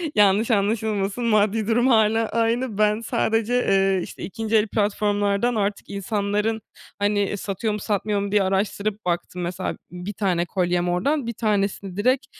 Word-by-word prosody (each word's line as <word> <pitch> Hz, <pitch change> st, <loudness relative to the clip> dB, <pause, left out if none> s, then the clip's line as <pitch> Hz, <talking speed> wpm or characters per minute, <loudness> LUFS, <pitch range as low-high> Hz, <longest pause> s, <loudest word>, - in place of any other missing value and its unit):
yanlış 210 Hz, +3 st, +4 dB
anlaşılmasın, 210 Hz, +1 st, 0 dB
maddi 215 Hz, -1 st, +2 dB
durum 240 Hz, +3 st, +3 dB
hâlâ 225 Hz, -1 st, +3 dB
aynı. 230 Hz, 0 st, 0 dB
Ben 210 Hz, +1 st, +3 dB
sadece, 225 Hz, 0 st, 0 dB
eee, 195 Hz, -5 st, +2 dB
işte -, -, -9 dB
2. 225 Hz, +2 st, -2 dB
el 215 Hz, 0 st, +4 dB
platformlardan 205 Hz, +2 st, 0 dB
artık 205 Hz, -1 st, -2 dB
insanların, 205 Hz, +2 st, -1 dB, 0.4 s
hani, 205 Hz, 0 st, +1 dB
satıyor 205 Hz, +3 st, -2 dB
mu 210 Hz, -, -3 dB
satmıyor 205 Hz, 0 st, -1 dB
mu 200 Hz, 0 st, -3 dB
diye 205 Hz, -1 st, +3 dB
araştırıp 200 Hz, +2 st, -1 dB
baktım, 175 Hz, +1 st, -2 dB
mesela 180 Hz, +2 st, -3 dB
b -, -, -14 dB, 0.3 s
bir 205 Hz, -, -4 dB
tane 180 Hz, -4 st, 0 dB
kolyem 175 Hz, -1 st, 0 dB
oradan, 265 Hz, +9 st, 0 dB
bir 235 Hz, -, -2 dB
tanesini 200 Hz, -3 st, -1 dB
direkt 255 Hz, +5 st, +2 dB
210 Hz, 155 wpm, -23 LUFS, 195-225 Hz, 0.4 s, yanlış